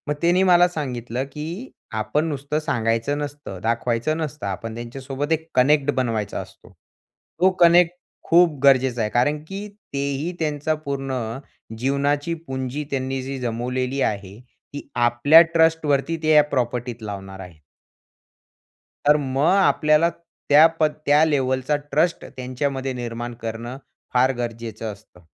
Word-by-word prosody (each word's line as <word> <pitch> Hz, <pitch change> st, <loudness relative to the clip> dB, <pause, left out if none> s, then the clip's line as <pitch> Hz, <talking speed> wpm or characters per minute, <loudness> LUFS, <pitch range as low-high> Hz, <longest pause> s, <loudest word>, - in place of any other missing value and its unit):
मग -, -, +2 dB
त्यांनी 175 Hz, +2 st, +3 dB
मला 180 Hz, -1 st, +6 dB
सांगितलं, 130 Hz, -7 st, -4 dB
की 165 Hz, -, -6 dB, 0.2 s
आपण 110 Hz, +8 st, 0 dB
नुसतं 145 Hz, 0 st, -2 dB
सांगायचं 120 Hz, -2 st, -1 dB
नसतं, 145 Hz, -9 st, -6 dB
दाखवायचं 115 Hz, +5 st, 0 dB
नसतं, 150 Hz, -6 st, -5 dB
आपण 110 Hz, +4 st, -5 dB
त्यांच्यासोबत 135 Hz, +5 st, -5 dB
एक 160 Hz, 0 st, 0 dB
कनेक्ट 145 Hz, +2 st, +4 dB
बनवायचा 115 Hz, -6 st, -1 dB
असतो. -, -, -15 dB, 0.7 s
तो 185 Hz, +2 st, +5 dB
कनेक्ट 170 Hz, 0 st, +6 dB, 0.4 s
खूप 165 Hz, -3 st, +4 dB
गरजेचा 130 Hz, -3 st, +4 dB
आहे. 105 Hz, -, 0 dB
कारण 145 Hz, +5 st, +1 dB
की 195 Hz, +3 st, -6 dB, 0.3 s
तेही 140 Hz, +4 st, -2 dB
त्यांचा 150 Hz, -1 st, -1 dB
पूर्ण 135 Hz, -1 st, -3 dB, 0.6 s
जीवनाची 140 Hz, +5 st, 0 dB
पुंजी 130 Hz, +2 st, -3 dB
त्यांनी 135 Hz, -1 st, -2 dB
जी 135 Hz, +1 st, -5 dB
जमवलेली 125 Hz, +3 st, -2 dB
आहे 100 Hz, -2 st, -2 dB, 0.3 s
ती 145 Hz, -, -7 dB
आपल्या 120 Hz, +7 st, +6 dB
ट्रस्टवरती 160 Hz, -2 st, +2 dB
ते 155 Hz, -, +1 dB
या 150 Hz, -1 st, +7 dB
प्रॉपर्टीत 125 Hz, -4 st, -3 dB
लावणार 95 Hz, -2 st, -7 dB
आहे. 90 Hz, -5 st, -11 dB, 1.5 s
तर 150 Hz, -, +7 dB
मग 140 Hz, +2 st, +1 dB
आपल्याला 165 Hz, -4 st, +4 dB
त्या 165 Hz, -2 st, +3 dB
पद 155 Hz, -1 st, +2 dB
त्या 145 Hz, +2 st, +5 dB
लेव्हलचा 130 Hz, -1 st, 0 dB, 0.2 s
ट्रस्ट 165 Hz, +3 st, +1 dB
त्यांच्यामध्ये 130 Hz, +1 st, -3 dB
निर्माण 120 Hz, -1 st, -5 dB
करणं 115 Hz, +3 st, -5 dB, 0.4 s
फार 130 Hz, +1 st, +4 dB
गरजेचं 115 Hz, -2 st, -5 dB
असतं. 100 Hz, -3 st, -19 dB
135 Hz, 130 wpm, -22 LUFS, 120-150 Hz, 1.5 s, या